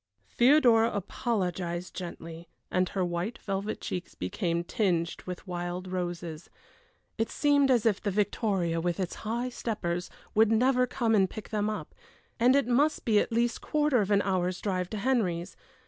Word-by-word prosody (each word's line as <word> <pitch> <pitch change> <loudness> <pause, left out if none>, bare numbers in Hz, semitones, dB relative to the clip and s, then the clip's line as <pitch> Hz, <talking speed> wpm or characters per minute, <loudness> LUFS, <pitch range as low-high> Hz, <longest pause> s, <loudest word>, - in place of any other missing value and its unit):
Theodora 240 -3 +5
apologized 180 -4 -2
gently, 170 -2 -8 0.2
and 185 0 +1
her 190 -2 -1
white 175 +6 -3
velvet 195 +1 -3
cheeks 180 0 -5
became 170 - -2
tinged 175 -3 0
with 180 +1 -6
wild 180 0 -4
roses. 175 -3 -4 0.7
It 225 - +1
seemed 285 -2 +3
as 240 -4 +3
if 215 -4 +2
the 205 - -1
victoria, 195 -4 0
with 175 +1 -1
its 185 -2 -2
high 235 +3 -2
steppers, 180 -8 -3 0.2
would 220 0 +4
never 250 +2 +3
come 230 -2 0
and 195 -3 +4
pick 215 - -8
them 210 -1 0
up; 215 - -5 0.5
and 250 +3 +5
it 280 - +3
must 280 +5 +2
be 215 -3 +4
at - - -1
least 235 +1 0
quarter 295 -5 +2
of 200 - -2
an 200 -1 +3
hour's 185 -2 0
drive 185 -3 -2
to 215 - -4
Henry's. 195 -8 0
200 Hz, 165 wpm, -29 LUFS, 175-230 Hz, 0.7 s, Theodora